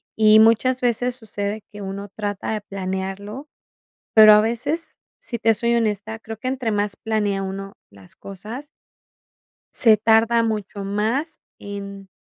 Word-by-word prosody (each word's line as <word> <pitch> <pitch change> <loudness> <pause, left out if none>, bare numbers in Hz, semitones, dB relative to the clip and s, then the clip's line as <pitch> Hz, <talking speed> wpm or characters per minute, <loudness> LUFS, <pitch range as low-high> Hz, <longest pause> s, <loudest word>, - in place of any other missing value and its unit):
Y 215 0 +6
muchas 230 +3 +4
veces 245 0 0
sucede 215 -3 -5
que 205 -1 -10
uno 200 +1 -6
trata 205 +1 -4
de 215 - -3
planearlo, 195 +5 -5 0.7
pero 215 -1 +10
a 210 - +6
veces, 240 +9 -3 0.2
si 235 - -5
te 225 0 +3
soy 235 +2 0
honesta, 220 -1 -1
creo 220 0 -8
que 255 - -6
entre 250 -4 -2
más 205 -1 -1
planea 210 -3 -1
uno 195 +1 -6 0.2
las 100 -2 -17
cosas 215 +9 -9 1.1
se 225 -3 +5
tarda 225 +2 +3
mucho 210 -2 -3
más 225 +11 -2 0.2
en 200 -1 -8
215 Hz, 145 wpm, -22 LUFS, 200-230 Hz, 1.1 s, pero